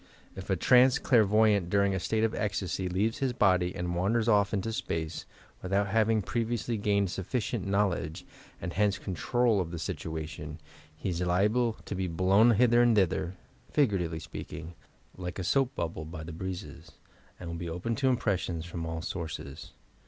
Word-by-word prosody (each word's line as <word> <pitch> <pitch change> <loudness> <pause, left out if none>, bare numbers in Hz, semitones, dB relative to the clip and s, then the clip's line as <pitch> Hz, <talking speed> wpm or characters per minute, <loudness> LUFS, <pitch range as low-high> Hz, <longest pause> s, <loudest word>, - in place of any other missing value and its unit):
If - - -8
a - - +3
t - - -6
ranee 125 +2 +7
el - - -11
ai 115 -3 +8
rvoy 110 +2 +4
_ - - +4
ant, 90 -4 -2
during 100 0 +2
a 95 - -1
state 110 +5 0
of 115 - +1
ecstasy, 95 -2 -2
leaves 105 +8 0
his 135 -3 0
body 90 -6 +2
and 90 -1 -2
wanders 110 +6 +1
off 105 -3 +4
into 110 +2 -2
space, 80 -6 -3 0.3
without 100 +2 0
having 110 0 +2
previously 120 +2 -1
gained 100 -3 +1
sufficient 100 +3 -2
knowledge, 100 -6 0 0.3
and 85 - -5
hence 100 -1 +2
control 110 +3 +1
of 85 - -4
the 85 - -5
situation, 80 -2 -5 0.4
he 95 - -3
ia 90 +1 -1
liable 105 +6 +2
to - - -5
be 95 -1 -2
blown 95 +7 +4
hither 120 +1 +5
and 120 -2 +4
thither 95 -2 +1 0.3
(figuratively 95 - +1
speaking) 80 +1 -8 0.4
like 90 0 -5
a 95 - -3
soap 135 +7 +1
bubble 80 -5 -3
by 80 0 -7
the 80 +1 -7
breezes, 95 +3 -7 0.5
and 85 -2 -6
will 85 - -5
be 85 0 -5
open 90 +8 -2
to 135 -1 +2
impressions 90 -9 -1
from 85 -1 -5
all 80 0 -4
sources. 85 -3 -6
95 Hz, 180 wpm, -29 LUFS, 85-110 Hz, 0.5 s, ai